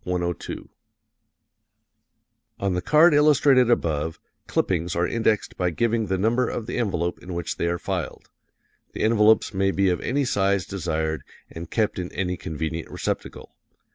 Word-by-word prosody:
102 85 Hz, -1 st, -3 dB, 1.0 s
] -, -, -50 dB
On 100 Hz, -1 st, 0 dB
the 90 Hz, -, -1 dB
card 155 Hz, -, +5 dB
illustrated 140 Hz, -4 st, +5 dB
above, 80 Hz, -7 st, 0 dB, 0.3 s
clippings 85 Hz, -2 st, 0 dB
are 85 Hz, +1 st, +1 dB
indexed 110 Hz, -1 st, 0 dB
by 90 Hz, -1 st, +1 dB
giving 115 Hz, +5 st, 0 dB
the 95 Hz, 0 st, 0 dB
number 115 Hz, +5 st, +1 dB
of 115 Hz, -, -4 dB
the 120 Hz, -, -3 dB
envelope 90 Hz, -6 st, -1 dB
in 90 Hz, -1 st, -7 dB
which 85 Hz, -1 st, -3 dB
they -, -, 0 dB
are 85 Hz, 0 st, 0 dB
filed. -, -, -5 dB, 0.6 s
The -, -, -3 dB
envelopes 110 Hz, 0 st, +4 dB
may 95 Hz, 0 st, +1 dB
be 95 Hz, 0 st, +2 dB
of 90 Hz, -, -1 dB
any 140 Hz, +3 st, 0 dB
size 100 Hz, -5 st, +1 dB
desired 80 Hz, -4 st, -2 dB, 0.3 s
and 80 Hz, 0 st, -8 dB
kept 110 Hz, -4 st, 0 dB
in 90 Hz, 0 st, -5 dB
any 90 Hz, -1 st, -1 dB
convenient 80 Hz, 0 st, -5 dB
receptacle. -, -, -5 dB
95 Hz, 155 wpm, -24 LUFS, 85-115 Hz, 1.0 s, card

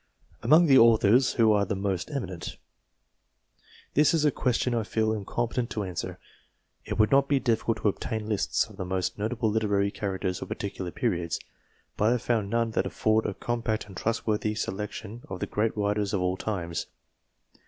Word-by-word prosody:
Among 155 Hz, +9 st, +6 dB
the 135 Hz, -4 st, +7 dB
authors, 115 Hz, +2 st, +5 dB
who 115 Hz, -2 st, +4 dB
are 105 Hz, -1 st, +3 dB
the 100 Hz, -, -2 dB
most 95 Hz, -2 st, -2 dB
eminent? 95 Hz, -, -5 dB, 1.4 s
This 150 Hz, +3 st, +4 dB
is 155 Hz, -2 st, +2 dB
a 150 Hz, -, +4 dB
question 125 Hz, -1 st, 0 dB
I 115 Hz, -, +1 dB
feel 110 Hz, 0 st, 0 dB
incompetent 115 Hz, +3 st, -2 dB
to 105 Hz, -, -3 dB
answer. 90 Hz, -3 st, -5 dB, 0.7 s
It -, -, -4 dB
would 110 Hz, -1 st, +3 dB
not 140 Hz, 0 st, +5 dB
be 140 Hz, -1 st, +3 dB
difficult 115 Hz, -2 st, 0 dB
to -, -, +3 dB
obtain 110 Hz, +1 st, -2 dB
lists 105 Hz, -3 st, +1 dB
of -, -, -15 dB
the -, -, -3 dB
most 95 Hz, +1 st, -2 dB
notable 110 Hz, +1 st, 0 dB
literary 100 Hz, -2 st, +1 dB
cha 100 Hz, -, -4 dB
racters 95 Hz, -1 st, -2 dB
of -, -, -5 dB
particular 95 Hz, -3 st, -4 dB
periods, 85 Hz, -5 st, -1 dB, 0.6 s
but 105 Hz, -, +1 dB
I 110 Hz, -, +4 dB
have 125 Hz, -, -2 dB
found 110 Hz, -5 st, 0 dB
none 115 Hz, +1 st, +1 dB
that -, -, 0 dB
afford 110 Hz, 0 st, +1 dB
a 100 Hz, -, -4 dB
compact 115 Hz, -2 st, -2 dB
and 100 Hz, -2 st, -13 dB
trustworthy 110 Hz, 0 st, -1 dB
selection 105 Hz, +2 st, -5 dB
of 95 Hz, -1 st, -5 dB
the -, -, -1 dB
great 110 Hz, +1 st, -1 dB
writers 105 Hz, 0 st, 0 dB
of 95 Hz, -, 0 dB
all 90 Hz, 0 st, +1 dB
times. 85 Hz, -5 st, -3 dB
110 Hz, 185 wpm, -27 LUFS, 100-115 Hz, 1.4 s, the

